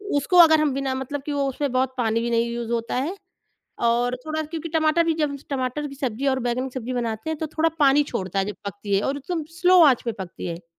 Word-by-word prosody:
उसको 285 +6 +2
अगर 320 -2 +8
हम 290 -3 +1
बिना 270 -1 -1
मतलब 270 +2 -4
कि 295 - -3
वो 280 -1 0
उसमें 280 0 -2
बहुत 260 0 0
पानी 230 -1 +1
भी 235 - -1
नहीं 235 0 +1
यूज़ 235 -1 -4
होता 230 0 -2
है। 300 +10 -1 0.7
और 240 +2 +2
थोड़ा 310 0 -2
क्योंकि 320 +1 -6
टमाटर 320 +1 +2
भी, 325 -1 +1
जब 300 -3 -1
टमाटर 270 +2 -2
की 275 - -10
सब्ज़ी 265 -1 -3
और 265 0 +1
बैंगन 245 +2 -1
की 255 - -17
सब्ज़ी 250 +2 -5
बनाते 235 +3 -3
हैं, 315 - -2
तो 315 - -2
थोड़ा 315 +2 +1
पानी 285 0 +5
छोड़ता 190 +1 -2
है 195 - +2
जब 210 - -5
पकती 200 0 -3
है, 195 - +3
और 275 +4 -1
एकदम 320 +2 -4
स्लो 365 0 +6
आँच 265 -5 +4
पे 230 - -1
पकती 180 - -8
है। 170 0 -6
265 Hz, 250 wpm, -23 LUFS, 235-305 Hz, 0.7 s, अगर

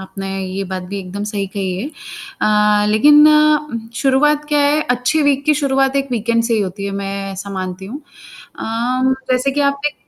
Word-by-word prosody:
आपने 195 0 -7 0.2
ये 190 +1 -4
बात 185 0 -5
भी 200 +1 -4
एकदम 195 +2 -6
सही 205 -1 -3
कही 190 -1 -4
है 265 - -4 0.5
अ, 210 0 +3
लेकिन 295 +8 +6
उम, 300 -6 +2
शुरुआत 290 +4 +2
क्या 295 -1 +1
है, 290 +2 +2
अच्छी 250 +6 +1
वीक 280 -1 +1
की 305 0 +3
शुरुआत 270 -1 +1
एक 275 0 -1
वीकेंड 230 0 0
से 230 0 +1
ही 220 - +1
होती 200 0 -4
है, 200 - -3
मैं 195 0 -4
ऐसा 195 +1 -7
मानती 185 -1 -5
हूँ। 265 +9 -8 0.6
अ, - - -6 0.7
जैसे 255 +2 +1
कि 285 +2 -2
आप 280 0 +1
एक 295 - -2
230 Hz, 195 wpm, -17 LUFS, 195-285 Hz, 0.7 s, लेकिन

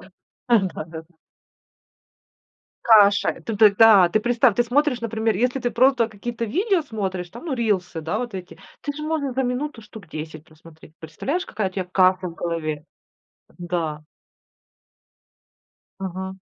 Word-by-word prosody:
Да, - - -16 0.6
да, - - -5
да. 160 -1 -8 1.8
Каша. 205 -3 +5
Т 225 - -3
ты, 215 0 +7
та, 205 -4 +7
представь, 235 +3 +2
ты 240 - +4
смотришь, 260 +1 +1
например, 225 -2 -1
если 250 +5 0
ты 245 - -1
просто 250 -1 +3
какие-то 230 +2 -5
видео 370 - +1
смотришь, 190 - -4
там, 235 - -11
ну, 295 - -1
рилсы, 195 -8 -1
да, 165 +7 -2
вот 240 -3 -5
эти. 185 -2 -8 0.2
Ты 290 - -4
же 300 +1 -8
можешь 305 -4 -2
за 265 - 0
минуту 250 +1 -3
штук 210 -4 -13
10 155 0 -8
посмотреть. 160 0 -18
Представляешь, 270 - -4
какая 210 -2 -2
у - - -22
тебя 190 -1 -3
каша 185 0 +2
в 165 - -10
голове? 155 -3 -4 0.7
Да. 170 -4 -3 2.0
Ага. 190 0 -5
210 Hz, 145 wpm, -22 LUFS, 175-245 Hz, 2.0 s, ты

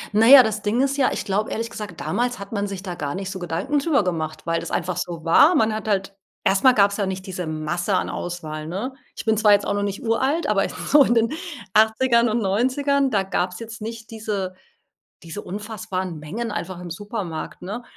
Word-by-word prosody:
Na 220 +2 +5
ja, 265 0 +11
das 215 -2 -2
Ding 210 +4 0
ist 275 0 0
ja, 275 -2 +3
ich - - -3
glaube 205 +2 0
ehrlich 230 +1 -3
gesagt, 210 -2 -7
damals 245 +1 -1
hat 200 0 -9
man 205 -2 -1
sich 195 -2 -6
da 185 -3 -4
gar 145 -4 -4
nicht 190 0 -4
so 190 - -6
Gedanken 175 - -1
drüber 280 -5 +2
gemacht, 160 -4 -3
weil 165 0 0
das - - -6
einfach 180 -1 -1
so 175 -2 -4
war. 290 - +6
Man 220 -6 +3
hat 215 0 -5
halt 195 -1 -1 0.3
erst 195 0 +2
mal 260 -1 +7
gab's 200 -2 +3
ja 200 - 0
nicht 190 0 -4
diese 180 -3 -5
Masse 170 +5 -1
an - - 0
Auswahl, 155 -3 -5
ne? 205 +11 -4 0.2
Ich - - -7
bin 220 -1 +2
zwar 210 -1 +6
jetzt 205 - +3
auch - - 0
noch 205 - -1
nicht 200 +2 -3
uralt, 265 +8 +1
aber - - +1
so 290 -1 +4
in 240 - +2
den 230 +4 +2 0.4
80ern 235 +2 +4
und 225 +1 0
90ern, 265 +7 +1
da 205 -5 +1
gab's 180 -1 -2
jetzt 225 -1 -8
nicht 225 +1 -7
diese 210 -4 -3 0.7
diese 170 +5 -7
unfassbaren 195 -4 -5
Mengen 210 +10 -4
einfach 185 -1 -4
im 175 -1 -8
Supermarkt, 190 -2 -5
ne? 210 +7 -5
205 Hz, 220 wpm, -23 LUFS, 185-230 Hz, 0.7 s, ja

